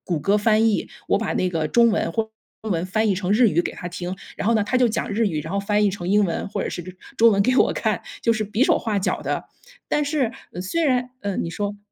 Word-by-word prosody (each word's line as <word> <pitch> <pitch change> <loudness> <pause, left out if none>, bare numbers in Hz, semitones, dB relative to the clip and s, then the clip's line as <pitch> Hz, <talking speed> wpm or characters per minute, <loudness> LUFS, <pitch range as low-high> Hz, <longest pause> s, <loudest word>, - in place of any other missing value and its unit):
谷 - - -2
歌 200 +8 +2
翻 215 +1 +3
译， 210 - -1 0.2
我 - - +4
把 225 - -2
那 185 - 0
个 160 -3 -1
中 235 +6 +4
文 - - 0
或 225 - +1
者 220 - -18 0.3
中 220 - -4
文 170 0 0
翻 220 +4 0
译 - - +3
成 185 0 -2
日 230 0 +5
语 170 +1 +2
给 - - -4
他 175 - -6
听， 180 +1 -5 0.2
然 205 - -2
后 230 - +4
呢 215 - +2
他 250 +5 0
就 250 -1 +4
讲 220 - -2
日 220 +1 +1
语， 155 -5 -2
然 160 - -7
后 200 - +1
翻 210 +1 +1
译 - - +3
成 180 -3 -6
英 205 +1 +4
文 170 - -3
或 200 -2 -3
者 - - -2
是 175 - -5 0.4
中 230 +1 +7
文 200 0 +3
给 255 +2 +2
我 - - +4
看， - - -1 0.2
就 230 - +3
是 215 -1 -1
比 210 +4 +1
手 - - +3
画 215 -3 -1
脚 - - -1
地。 - - -2 0.4
但 295 - +1
是 280 -6 0 0.3
虽 330 - -1
然 250 -2 +1
嗯， 200 -2 -2
你 165 - -4
说。 205 +3 -3
210 Hz, 295 characters per minute, -23 LUFS, 185-230 Hz, 0.4 s, 中